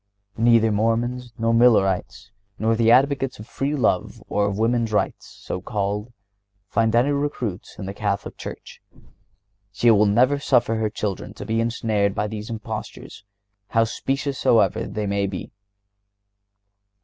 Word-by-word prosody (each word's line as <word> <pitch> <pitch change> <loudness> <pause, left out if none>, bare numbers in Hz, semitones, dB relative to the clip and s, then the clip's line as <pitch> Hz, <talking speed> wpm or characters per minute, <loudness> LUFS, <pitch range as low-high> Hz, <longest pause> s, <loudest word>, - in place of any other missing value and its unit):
Neither 115 -1 +4
Mormons 120 +3 0
nor 115 0 +1
Millerites, 105 -4 +2 0.3
nor 115 +1 +1
the 115 0 +3
advocates 135 +1 +3
of 105 - -10
free 140 +5 -2
love 110 -9 0
or 105 0 +1
of 100 -1 -3
women's 115 0 +1
rights, 105 - -1
so 90 - -7
called, 105 +2 -3 0.6
find 110 +1 +1
any 125 +5 +3
recruits 140 -9 -3
in 100 - -6
the 100 - -5
Catholic 100 -1 -3
Church. - - -9 0.9
She 115 +4 +3
will 105 -1 +5
never 125 +7 +3
suffer 120 -5 +2
her 110 -1 0
children 105 -3 -4
to - - -8
be 110 +1 0
ensnared 110 -3 0
by 105 - 0
these 105 +1 -6
impostures, 110 -2 -7 0.4
how 115 +2 +2
specious 135 +4 -2
soever 115 - +3
they 105 -1 -3
may 100 0 0
be. 95 -2 -6
110 Hz, 145 wpm, -23 LUFS, 105-120 Hz, 0.9 s, will